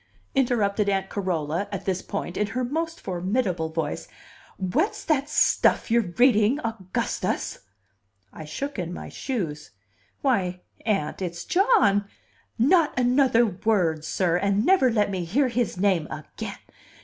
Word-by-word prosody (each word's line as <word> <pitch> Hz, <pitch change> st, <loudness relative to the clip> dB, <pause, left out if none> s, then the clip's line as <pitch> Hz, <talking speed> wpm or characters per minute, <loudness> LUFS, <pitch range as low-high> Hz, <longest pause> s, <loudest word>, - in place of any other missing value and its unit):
interrupted 215 Hz, -6 st, +1 dB
Aunt 195 Hz, -1 st, -1 dB
Carola, 175 Hz, -1 st, -1 dB
at 200 Hz, -, -5 dB
this 185 Hz, -1 st, -1 dB
point, 195 Hz, -3 st, -5 dB
in 210 Hz, -, 0 dB
her 250 Hz, +4 st, -2 dB
most 325 Hz, +6 st, -2 dB
formidable 185 Hz, -2 st, -1 dB
voice. 160 Hz, -2 st, -3 dB, 0.5 s
"What's 245 Hz, -, -1 dB
that 295 Hz, -3 st, +1 dB
stuff 300 Hz, -, +3 dB
you're 225 Hz, -7 st, +1 dB
reading, 240 Hz, +1 st, +4 dB
Augustus?" 220 Hz, -6 st, -2 dB, 0.7 s
I 155 Hz, -, -8 dB
shook 275 Hz, -, -5 dB
in 175 Hz, -1 st, -3 dB
my -, -, -7 dB
shoes. 160 Hz, -, -4 dB, 0.5 s
"Why, 185 Hz, -9 st, +1 dB, 0.3 s
Aunt, 195 Hz, -6 st, 0 dB
it's 175 Hz, -1 st, -4 dB
John 365 Hz, -, +3 dB, 0.3 s
" -, -, -37 dB, 0.2 s
"Not 330 Hz, -7 st, +3 dB
another 250 Hz, -1 st, +4 dB
word, 185 Hz, -6 st, 0 dB
sir! 175 Hz, +2 st, +1 dB
And 200 Hz, +3 st, +1 dB
never 360 Hz, -10 st, +4 dB
let 210 Hz, -3 st, +1 dB
me 185 Hz, -2 st, -2 dB
hear 255 Hz, +11 st, +1 dB
his 235 Hz, -4 st, -1 dB
name 185 Hz, -5 st, +2 dB
again. 155 Hz, -1 st, -7 dB
205 Hz, 135 wpm, -25 LUFS, 180-250 Hz, 0.7 s, reading